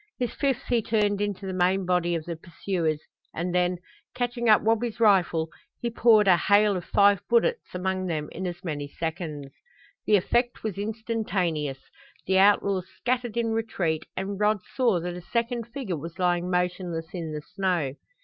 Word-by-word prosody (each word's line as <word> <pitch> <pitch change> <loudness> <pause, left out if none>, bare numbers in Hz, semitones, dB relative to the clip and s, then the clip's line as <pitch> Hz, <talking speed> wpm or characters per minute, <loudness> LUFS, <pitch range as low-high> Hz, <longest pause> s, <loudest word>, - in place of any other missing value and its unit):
His 245 -2 -2
fifth 275 -4 0
he 240 -2 +2
turned 205 -2 +1
into 205 -1 -2
the 190 - -3
main 185 +1 +2
body 175 -1 +1
of 160 -2 -4
the 170 - -4
pursuers, 165 -1 -2 0.4
and 175 +2 -2
then, 180 0 +2 0.4
catching 240 -1 -1
up 215 - +6
Wabi's 225 +1 0
rifle, 175 -7 +3 0.3
he 235 - -2
poured 220 -3 +5
a 185 - +7
hail 205 +3 +4
of 180 - -4
five 200 -1 +4
bullets 240 - +1
among 185 0 -1
them 155 -3 -2
in 185 +2 -4
as 175 +1 -6
many 145 -4 -3
seconds. 155 -3 -5 0.5
The 210 - +6
effect 240 +5 +1
was 210 -3 -3
instantaneous. 200 - -2 0.4
The 190 0 +3
outlaws 195 -2 +3
scattered 245 -2 -1
in 230 -1 +1
retreat 190 -8 -1
and 195 +1 -3
Rod 210 -1 +2
saw 235 -9 +3
that 175 +1 -4
a 180 - -7
second 235 +3 -2
figure 235 - -4
was 165 +4 -8
lying 180 -1 +1
motionless 180 -2 -2
in 165 -4 -4
the 150 0 -4
snow. 180 -8 -1
190 Hz, 170 wpm, -26 LUFS, 175-220 Hz, 0.5 s, a